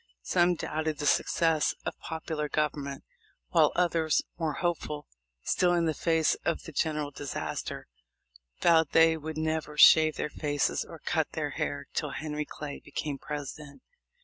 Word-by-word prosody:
Some 175 - +3
doubted 155 -1 -2
the 145 - -4
success 160 +1 +2
of - - -3
popular 160 -2 -4
government, 145 -2 -2 0.5
while - - +4
others, 165 -3 +2 0.2
more 160 -2 0
hopeful 155 -2 -2 0.4
still 175 -1 +2
in 170 -1 +2
the 160 - +1
face 160 0 +2
of 170 - -1
the 160 - -9
general 150 -1 -1
disaster, 140 -1 -5 0.8
vowed 160 -3 +4
they 165 0 +6
would 160 0 -6
never 155 -1 -2
shave 155 0 +7
their - - -2
faces 145 -2 0
or - - -11
cut - - -1
their - - -2
hair - - -3
till - - -2
Henry 150 -1 -3
Clay 145 -1 -7
became 145 0 -4
President. 150 - -7
155 Hz, 150 wpm, -29 LUFS, 150-160 Hz, 0.8 s, shave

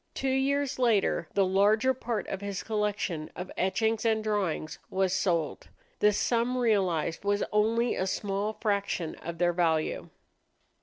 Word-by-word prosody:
Two 270 - -1
years 275 +1 0
later 220 -8 +2
the 195 - +4
larger 210 +7 +3
part 235 -3 -3
of 195 - -4
his 200 -1 -4
collection 205 -7 -2
of 180 +1 -6
etchings 220 +4 0
and 220 -1 +1
drawings 195 -7 -2
was 190 -1 +1
sold. 175 -5 -1 0.3
The 210 - +5
sum 235 +4 0
realized 190 -9 +1
was 205 0 +1
only 225 +3 +2
a 185 - -1
small 200 +2 -2
fraction 200 -6 -1
of 170 0 -7
their 175 0 +2
value. 165 -3 0
205 Hz, 145 wpm, -29 LUFS, 185-225 Hz, 0.3 s, The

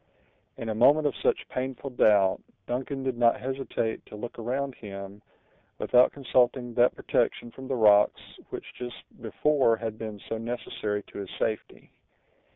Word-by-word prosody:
In 115 - -5
a - - 0
moment 145 +7 +5
of 145 - +2
such - - +1
painful 130 +1 -4
doubt, 100 -6 +4 0.2
Duncan 130 +3 -3
did 130 -2 -2
not 120 -1 +4
hesitate 130 -3 -3
to - - -10
look 120 +3 -7
around 130 +4 -2
him, 100 -2 -9 0.6
without 125 0 +4
consulting 125 -2 +1
that 120 +1 +4
protection 120 - 0
from 130 +2 -10
the 130 - -1
rocks 105 -3 +3
which - - -6
just 120 -1 -8 0.2
before 145 -6 +2
had 110 -1 -5
been 110 -2 -6
so 115 - -3
necessary 110 -3 -3
to - - -10
his 100 -2 -6
safety. 110 -1 -3
120 Hz, 155 wpm, -27 LUFS, 110-130 Hz, 0.6 s, moment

